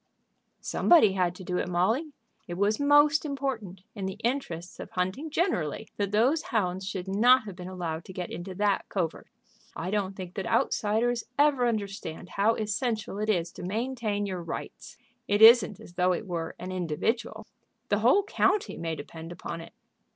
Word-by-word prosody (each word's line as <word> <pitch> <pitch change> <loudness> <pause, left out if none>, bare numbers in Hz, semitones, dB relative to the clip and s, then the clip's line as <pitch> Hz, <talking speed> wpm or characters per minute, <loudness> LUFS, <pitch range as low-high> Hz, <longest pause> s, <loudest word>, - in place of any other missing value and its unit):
"Somebody 315 - +5
had 180 -2 0
to 185 - -10
do 180 0 -2
it, - - -2
Molly. 220 - +1 0.4
It 175 - -5
was 205 +3 +1
most 290 +1 +5
important, 260 - -4
in 195 -3 -4
the 190 +1 -5
interests 185 -9 -3
of - - -7
hunting 190 +12 -2
generally, 220 - -1
that 200 -1 -1
those 250 +10 +3
hounds 190 -3 -1
should 190 -3 -5
not 240 +6 +5
have 200 -4 -8
been 180 0 -8
allowed 170 -3 -4
to 185 - -10
get 180 -1 -5
into 185 +2 -6
that 200 0 0
covert. 175 -5 -2 0.5
I 180 - -4
don't 200 -2 -1
think 185 -2 -7
that 195 - -4
outsiders 230 +3 +1
ever 285 -4 +4
understand 200 -6 -4
how 215 +5 +2
essential 215 -1 -2
it 215 +1 -1
is 175 -5 +1
to - - -10
maintain 215 +1 -2
your 185 -3 -4
rights. 165 - -7 0.3
It 205 0 +2
isn't 225 -4 +8
as 175 - -13
though 180 +1 +2
it 180 - -4
were 170 -3 -4
an 185 +1 -6
individual. 200 +6 -2 0.4
The 205 - +2
whole 250 - +4
county 420 +1 +1
may 165 -1 -3
depend 165 +1 -9
upon 165 -1 -6
it." 165 - -12
200 Hz, 175 wpm, -28 LUFS, 180-235 Hz, 0.5 s, isn't